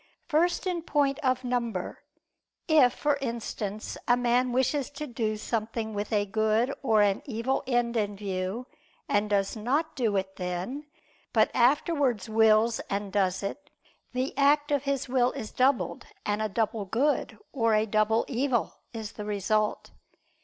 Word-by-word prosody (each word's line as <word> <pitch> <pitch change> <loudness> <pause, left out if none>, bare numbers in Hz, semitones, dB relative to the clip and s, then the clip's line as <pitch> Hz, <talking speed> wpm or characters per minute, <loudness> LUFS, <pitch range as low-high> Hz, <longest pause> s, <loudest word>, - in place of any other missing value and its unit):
First 340 +4 +1
in 360 -2 -1
point 285 -3 +1
of 255 -3 0
number; 235 -6 -2 0.7
if, 300 -7 +6
for 290 +3 0
instance, 220 -4 -4
a 245 - +5
man 245 +1 +2
wishes 260 +2 +1
to 300 +1 -6
do 225 -5 -2
something 220 0 -3
with 205 +2 -3
a 205 -2 +2
good 220 +5 +1
or 220 -6 +4
an 200 -1 +1
evil 245 +2 -1
end 240 -2 +1
in 205 -2 0
view, 195 +3 -3 0.4
and 205 0 +1
does 200 0 +1
not 280 +9 -1
do 225 -5 0
it 190 0 -3
then, 185 +11 -4 0.5
but - - +4
afterwards 260 - +2
wills 220 +1 +4
and 200 0 -3
does 190 -2 +1
it, 290 +9 -5 0.4
the 255 +2 -2
act 290 +1 +4
of 285 -1 +1
his 275 -1 -1
will 250 -1 +2
is 215 - -6
doubled 260 +1 +1 0.2
and 210 +1 0
a 215 - 0
double 215 0 -1
good, 255 +10 0 0.2
or 230 -4 +2
a 215 +1 +3
double 215 +1 +2
evil 255 -2 -1
is 220 -2 -5
the 210 - -7
result. 210 +1 0
230 Hz, 155 wpm, -28 LUFS, 210-265 Hz, 0.7 s, if